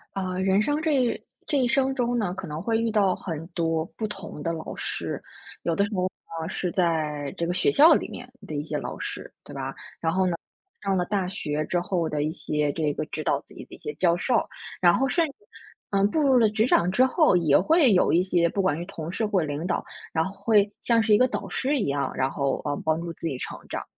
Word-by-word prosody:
啊， 185 -1 -2
人 190 +2 +3
生 290 +7 0
这 320 -1 +1
一 250 -3 +1 0.2
这 290 - +1
一 255 - +3
生 265 +1 +2
中 245 -2 0
呢， 190 -5 -1
可 190 - -5
能 150 +1 -5
会 225 +3 +1
遇 230 0 0
到 200 -4 +3
很 165 -3 -5
多 165 -2 -1
不 220 - -2
同 195 -7 -8
的 165 - -1
老 160 -1 -6
师， - - -4 0.4
有 170 - 0
的 200 - +3
时 205 - -7
候 180 - 0
呢 165 -3 -5
是 180 0 -2
在 155 -5 0
这 170 - -2
个 175 - 0
学 185 - +2
校 310 +3 +7
里 - - -1
面 250 0 -9 0.2
的 155 - -5
一 145 - -2
些 155 - -3
老 - - -5
师， - - -6
对 - - -11
吧？ 135 0 -4 0.3
然 165 0 0
后 190 0 +2
呢， 175 - 0 0.5
上 195 -1 +1
了 180 - +2
大 195 -1 -1
学 155 -4 -2
之 175 - 0
后 175 -1 -1
的 150 -2 -1
一 155 - -1
些 150 -2 -1
这 155 -3 0
个 155 - -3
指 155 - -5
导 - - +1
自 - - -18
己 - - -9
的 - - -16
一 - - -17
些 445 - -5
教 170 -2 +3
授， 230 +6 +1 0.3
然 175 -1 +6
后 270 +6 +1
甚 335 +2 +2
至， - - -11 0.6
嗯， 200 0 +3
步 315 - +1
入 270 -3 +5
了 225 -3 +5
职 220 +2 +2
场 180 -7 +3
之 250 +7 +4
后， 305 - +4
也 160 -5 +4
会 300 - +4
有 180 - +3
一 175 - +5
些 175 -2 +2
不 195 - -1
管 185 -6 +1
是 170 - -5
同 170 -4 -6
事 220 +4 -1
或 205 -3 +1
领 150 +1 -3
导， 180 - -1 0.3
然 160 - +1
后 190 - -4
会 210 -2 +4
像 230 -1 +3
是 220 -1 +3
一 - - +5
个 255 - +4
导 - - -4
师 275 +3 0
一 - - 0
样， 140 0 -1
然 130 0 +1
后， 140 -1 -1
呃， 145 -1 0
帮 160 +1 +1
助 170 0 -4
自 - - -9
己 145 - -2
成 - - -5
长。 - - -4
185 Hz, 275 characters per minute, -26 LUFS, 160-225 Hz, 0.6 s, 校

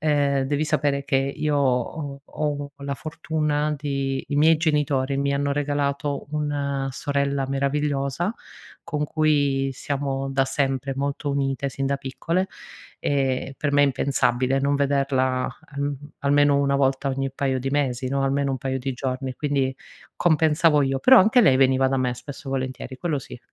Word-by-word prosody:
ehm, 145 -3 +2
devi 145 +3 0
sapere 145 -2 0
che 135 -1 +1
io 140 +2 0
ho 140 +2 -1
ho 145 -2 -3
la 140 0 -4
fortuna 150 0 -1
di 140 -2 -2
i 145 - -1
miei 160 +2 +5
genitori 145 -4 +1
mi 140 0 0
hanno 140 0 0
regalato 145 0 -1
una 140 -2 -2
sorella 140 -1 -1
meravigliosa, 140 - -1 0.5
con 150 -2 -2
cui 145 -3 +1
siamo 135 0 -3
da 135 0 +2
sempre 135 -1 -1
molto 140 +1 -2
unite 140 0 -1
sin 135 0 -3
da 140 0 +1
piccole, 165 +7 -2 0.5
ehm, 135 -1 0
per 145 -1 -1
me 145 0 +5
è - - +7
impensabile 130 -1 +1
non 140 +1 +1
vederla 135 -2 +1 0.2
alm 140 0 -2 0.2
almeno 145 0 +4
una 140 0 +1
volta 135 0 +1
ogni 135 0 -2
paio 135 -1 -1
di 135 +1 -2
mesi 130 -3 0
no, 135 0 0
almeno 140 0 +1
un 130 - -2
paio 130 +1 -2
di 135 +1 -3
giorni, 130 0 -3
quindi 140 -2 0 0.4
compensavo 160 -2 +3
io, 135 0 0
però 260 - +7
anche 220 +5 +5
lei 155 - +5
veniva 130 0 +4
da 135 - 0
me 125 -1 0
spesso 140 +2 -9
e - - -3
volentieri 130 0 -4
quello 165 -5 -1
sì. 125 - -10
140 Hz, 165 wpm, -24 LUFS, 135-145 Hz, 0.5 s, è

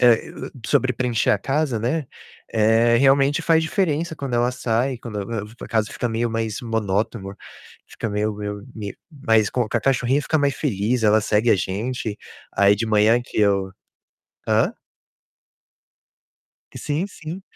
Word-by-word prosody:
eh, 120 -3 +5
e - - -10
o - - -8 0.2
sobre 130 -1 +2
preencher 120 -2 0
a - - +3
casa, 135 +2 0
né. 130 +7 -1 0.5
Eh, 115 +2 +4
realmente, 140 +2 +4
faz 160 -1 +3
diferença 160 -1 0
quando 135 -3 -4
ela 120 +1 +2
sai, 125 +1 0
quando 110 -4 -5
eu 100 +3 -6
eu 105 - -8
vou 110 - -16
pra - - -9
casa 110 -3 0
fica 120 - -2
meio 115 +1 -1
mais 110 -2 -2
monótona, 105 -3 -2 0.5
fica - - -5
meio 105 +1 -1
meio 105 0 -5
meio 105 -3 -6
mais 115 -8 +2
com 125 -3 0
com 120 - -1
a 115 - +1
cachorrinha 135 +2 +1
fica 160 - +1
mais 140 -1 +1
feliz, 115 -2 -1
ela 110 0 +5
segue 110 +2 +2
a - - +5
gente. 105 +3 -3 0.4
Aí, 100 0 +5
de 115 +2 -2
manhã 110 +2 +4
que 120 - -7
eu 100 -2 +2 0.8
Hã? - - +2 2.0
Sim, 150 +6 -2
sim. 180 -1 -8
115 Hz, 170 wpm, -22 LUFS, 105-135 Hz, 2.0 s, eh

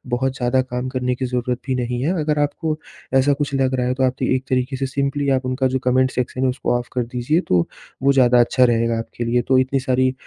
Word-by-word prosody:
बहुत 130 +1 -1
ज़्यादा 125 +1 +2
काम 125 0 -4
करने 125 -1 -1
की 130 - -3
ज़रूरत 125 0 -2
भी 130 - 0
नहीं 125 -1 -2
है। 165 +6 +1
अगर 150 0 0
आपको 155 +2 -1 0.4
ऐसा 135 +2 +4
कुछ 145 0 -3
लग 130 -1 +1
रहा 125 -1 0
है 125 - +1
तो 130 - -1
आप 130 -1 +2
त - - -2
एक 130 +1 +1
तरीके 130 +1 0
से 135 - -1
सिंपली 140 +1 -1
आप 130 -1 +1
उनका 130 +1 0
जो 130 +1 -1
कमेंट 130 +1 +3
सेक्शन 125 0 -3
है - - +3
उसको 125 -1 -1
ऑफ 120 0 -5
कर 125 - 0
दीजिए 125 +6 0
तो 90 - +3 0.4
वो 140 - +5
ज़्यादा 125 -2 +5
अच्छा 125 +2 +3
रहेगा 115 -1 +1
आपके 120 +1 -6
लिए 120 +1 +2
तो 130 - +4
इतनी 130 +1 +1
सारी 130 -1 +1
130 Hz, 250 wpm, -21 LUFS, 125-135 Hz, 0.4 s, वो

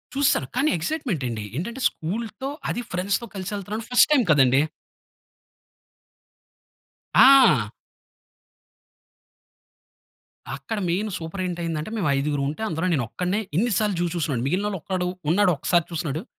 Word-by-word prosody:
చూస్సాను. 275 - +2
కానీ 275 +5 +2
ఎక్స్సైట్మెంట్ 185 - -2
అండి. 110 -3 -4
ఏంటంటే, 235 - -4
స్కూల్‌తో, 220 +9 -5 0.2
అదీ 240 - -3
ఫ్రెండ్స్‌తో 195 +6 -1
కల్సెల్తన్నాను. 205 +3 -5
ఫస్ట్ 245 - +6
టైం 270 -4 +4
కదండీ! 135 -1 +5 2.5
ఆ! 245 - +7 2.9
అక్కడ 140 +11 -5
మెయిన్ 200 +5 0
సూపర్ 165 +3 -6
ఏంటి 175 -1 -4
అయిందంటే, 160 0 -3
మేము 190 -6 0
ఐదుగురు 145 0 -1
ఉంటే 155 - -7
అందులో 165 -1 -2
నేను 135 -6 0
ఒక్కడినే, 180 +8 -1 0.2
ఇన్ని 235 +5 +2
సార్లు 210 -3 +1
జూ - - +1
చూసినోడిని. 145 -8 -1
మిగిలినోళ్ళలో 195 +4 -1
ఒక్కడు, 185 -2 -2 0.2
ఉన్నాడు 190 +1 +4
ఒకసారి 170 +3 +1
చూసినోడు. 160 0 -3
180 Hz, 120 wpm, -24 LUFS, 155-215 Hz, 2.9 s, ఆ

